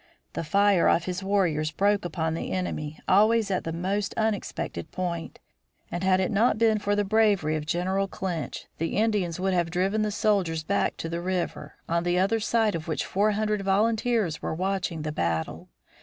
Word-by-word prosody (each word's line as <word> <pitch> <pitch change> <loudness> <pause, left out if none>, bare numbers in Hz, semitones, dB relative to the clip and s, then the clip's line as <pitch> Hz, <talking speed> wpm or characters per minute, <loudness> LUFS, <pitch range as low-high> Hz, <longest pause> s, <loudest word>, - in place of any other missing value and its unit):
The - - -3
fire 200 +2 +3
of 170 - +2
his 180 0 -3
warriors 180 -6 +1
broke 200 +3 +1
upon 160 -1 -2
the 165 - -4
enemy 155 -5 -3
always 215 +2 +4
at 185 - -1
the 165 - -2
most 195 +5 -2
unexpected 220 -2 -2
point, 175 -2 -4 0.5
and 175 +1 -3
had 185 0 +3
it 190 - 0
not 220 +2 +3
been 220 -1 +3
for 205 0 0
the 205 - +1
bravery 200 -7 +2
of 150 -1 -4
General 190 +4 0
Clinch, 175 -8 -4
the 165 +4 -1
Indians 205 -6 +1
would 190 0 0
have 175 -2 +1
driven 190 +5 0
the 215 - +1
soldiers 195 -7 +1
back 200 +5 0
to - - -4
the 170 +1 -3
river, 180 0 -3
on 170 +1 +1
the 175 0 +1
other 200 +5 +2
side 220 -1 +1
of 165 -1 -5
which 160 - -2
four 210 +2 +1
hundred 210 0 0
volunteers 215 -2 +1
were - - -3
watching 185 -3 -2
the 155 - -2
battle. 80 - -2
190 Hz, 185 wpm, -26 LUFS, 170-205 Hz, 0.5 s, always